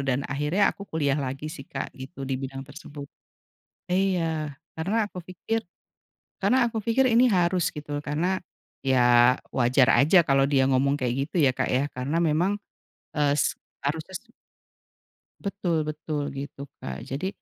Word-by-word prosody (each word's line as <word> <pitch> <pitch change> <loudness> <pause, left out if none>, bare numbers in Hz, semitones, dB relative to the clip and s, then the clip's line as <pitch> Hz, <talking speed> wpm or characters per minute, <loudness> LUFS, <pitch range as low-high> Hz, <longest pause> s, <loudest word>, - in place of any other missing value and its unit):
dan 135 +1 0
akhirnya 150 +8 +1
aku 200 - -11
kuliah 145 -3 +1
lagi 140 +4 -4
sih, 135 - -10
Kak, - - -5
gitu, 135 +1 -8
di 130 -1 -2
bidang 135 0 -6
tersebut. 145 0 -10 0.8
Iya, 175 -5 0 0.2
karena 205 +7 0
aku 180 -3 -9
pikir 220 +6 -3 0.8
karena 255 - +3
aku 225 - -3
pikir 230 +5 +3
ini 245 +2 +6
harus 180 -1 +2
gitu. 145 -1 -4
Karena, 170 +6 0 0.5
ya 125 -2 +5 0.2
wajar 125 +1 +3
aja 155 +7 +6
kalau 135 0 +4
dia 140 -2 +3
ngomong 135 +2 +3
kayak 125 -2 0
gitu - - -16
ya, 135 - +5
Kak, - - 0
ya? 130 +2 +2
Karena 130 +5 -3
memang, 170 +5 +2 0.6
eee, 145 -2 +2 0.5
harusnya 155 +6 -3
sih - - -28 1.1
Betul-betul, 155 -6 -2
gitu, 140 0 -6 0.2
Kak. 65 +1 -6
Jadi 145 +8 -3
150 Hz, 145 wpm, -26 LUFS, 135-180 Hz, 1.1 s, ini